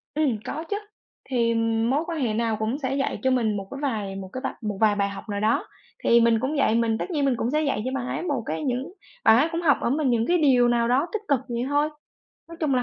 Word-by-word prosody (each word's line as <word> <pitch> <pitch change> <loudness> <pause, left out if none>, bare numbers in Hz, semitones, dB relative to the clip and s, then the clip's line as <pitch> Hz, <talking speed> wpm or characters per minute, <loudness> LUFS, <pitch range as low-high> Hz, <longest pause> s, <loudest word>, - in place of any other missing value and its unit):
Ừm, 290 -8 +1
có 305 +4 -4
chứ, 410 - 0 0.5
thì, 235 -3 +1
ừm, 225 0 +1
mối 285 +5 +1
quan 335 -2 -3
hệ 240 -6 0
nào 225 0 0
cũng 220 +5 -1
sẽ 270 -2 -2
dạy 275 - -1
cho 260 - +3
mình 225 -5 +1
một 195 -1 -6
cái 275 - -6
vài 215 -9 -2
một 190 -1 -7
cái 255 - -4
vập 265 - -2
một 210 -2 -3
vài 215 -2 +4
bài 200 -1 0
học 200 +3 -9
nào 205 0 -2
đó. 215 +2 +1 0.4
Thì 235 0 +5
mình 230 -1 +4
cũng 265 +6 -2
vậy, 250 -5 +3
mình 230 -1 +1
tất 370 - -4
nhiên 295 -4 +1
mình 265 -3 +2
cũng 235 - -1
sẽ 305 +1 +2
dạy 275 -8 0
cho 260 - -1
bạn 250 -2 -3
ấy - - -3
một 285 -9 -1
cái 155 +1 -3
những 255 +6 -2 0.3
bạn 220 - +7
ấy 305 +6 +3
cũng 335 0 -2
học 285 -7 +4
ở - - 0
mình 285 +1 +1
những 230 -2 +2
cái 355 - +3
điều 260 -6 +4
nào 235 -1 +2
đó 265 +7 +2
tích 440 - -1
cực 280 -4 +3
vậy 235 0 -2
thôi. 290 +1 +2 0.6
Nói 335 - -10
chung 295 -5 +1
là 250 - +2
245 Hz, 285 wpm, -25 LUFS, 225-285 Hz, 0.6 s, bạn